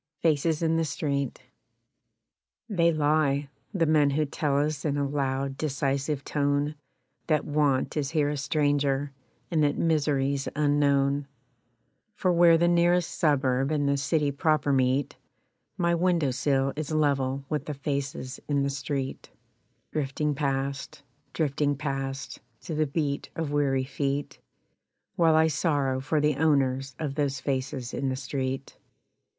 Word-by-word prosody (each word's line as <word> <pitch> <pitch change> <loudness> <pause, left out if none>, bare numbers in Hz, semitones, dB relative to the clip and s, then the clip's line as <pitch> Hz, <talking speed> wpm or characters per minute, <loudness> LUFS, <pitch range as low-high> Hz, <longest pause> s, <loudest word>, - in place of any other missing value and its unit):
Faces 160 0 +2
in 165 0 +2
the 165 - +2
Street 140 -4 -2 1.2
They 170 -6 +3
lie, 145 -2 +1 0.2
the 185 -6 +1
men 150 -2 +4
who 150 +2 +1
tell 145 0 -1
us 145 0 0
in 145 -2 0
a 140 -1 0
loud 135 -1 -2
decisive 140 -1 -1
tone 145 +1 0 0.5
That 155 -2 +1
want 145 -3 +1
is 145 -3 -1
here 150 -2 +1
a 150 - -2
stranger, 145 -1 0 0.4
and 160 -2 +2
that 145 0 +1
misery's 140 -4 +1
unknown; 145 -1 +2 0.9
For 185 -3 +1
where 170 -1 +6
the 170 +1 +3
nearest 175 0 +3
suburb 135 -4 +1
and 145 -2 0
the 140 - +2
city 145 +1 +1
proper 145 0 +1
meet 130 +1 +1 0.6
My 170 -1 +2
window 170 -5 +2
sill 135 +1 +1
is 150 -1 -4
level 140 -3 +1
with 150 -1 -3
the 150 - -3
faces 140 -2 -4
in 140 -2 +1
the 140 - 0
street 135 -1 -4 0.6
Drifting 150 0 -1
past, 140 +1 -3 0.3
drifting 145 -2 0
past, 135 -1 -4 0.2
To 170 - -6
the 155 0 +1
beat 140 -1 -2
of 160 -3 -3
weary 140 -3 +1
feet 140 +1 -3 0.8
While 165 -2 +4
I 160 0 +5
sorrow 145 -4 0
for 150 +3 0
the 150 -1 +1
owners 135 -3 +1
of 150 -3 -3
those 140 -2 -1
faces 130 -2 -3
in 135 - -1
the 130 - -1
street. 130 0 -4
145 Hz, 140 wpm, -27 LUFS, 135-155 Hz, 1.2 s, where